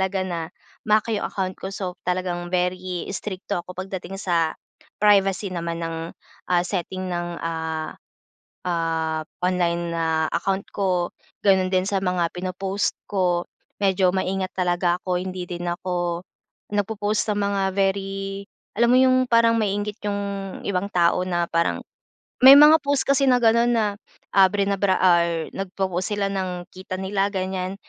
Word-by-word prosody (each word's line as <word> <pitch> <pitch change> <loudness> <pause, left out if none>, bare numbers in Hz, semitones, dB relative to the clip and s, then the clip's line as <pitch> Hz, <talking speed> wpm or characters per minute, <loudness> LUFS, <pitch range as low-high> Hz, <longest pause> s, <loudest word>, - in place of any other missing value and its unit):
talaga 190 0 0
na 170 -3 -4 0.4
ma-hack 215 +2 +3
'yung - - -2
account 190 -1 -3
ko. - - -6
So, 180 -2 -5
talagang 180 -1 -1
very 180 0 -2
strikto 190 -2 -4
ako 180 +1 -8
pagdating 190 +1 -6
sa 165 -3 +1 0.5
privacy 195 -1 +3
naman 170 -1 -4
ng, 165 0 -3 0.5
ah, 175 -1 +4
setting 185 0 -3
ng, 175 0 -2
ah, 160 -1 -3 0.7
ah 160 -2 -1 0.2
online 175 -2 0
na 160 -1 +1
account 195 0 -1
ko, 180 -3 0 0.3
gano'n 190 -2 +3
din 185 0 +3
sa 195 - +1
mga 180 -3 0
pinopost 190 +2 -2 0.2
ko, 180 -3 +1 0.3
medyo 190 -2 +3
maingat 190 0 -1
talaga 175 -1 +1
ako. 180 -1 0
Hindi 185 0 -4
din 175 0 -4
ako, 175 0 -2 0.5
nagpo-post 210 +1 -1
ng 205 - -1
mga 200 -1 0
very 195 0 -1 0.3
alam 235 0 +4
mo - - +6
'yung 255 0 +4
parang 230 -1 +4
maiinggit 205 0 -1
yung 200 0 -1 0.4
ibang 195 0 -1
tao 175 +1 +2
na 175 -2 -1
parang 170 0 0 0.6
may 265 +2 +10
mga 300 +2 +9
post 285 -1 +1
kasi 275 0 +2
na 250 -2 +4
gano'n 235 +1 +4
na 225 -2 +2 0.4
ah, 195 -1 +6
brinabra 200 0 +1
or 170 -2 +3
nag 195 -1 -5
popost 185 +1 -1
sila 200 -1 -1
ng 185 -2 -3
kita 185 0 -7
nila 195 +1 0
ganyan, 185 0 -2
185 Hz, 150 wpm, -23 LUFS, 175-200 Hz, 0.7 s, may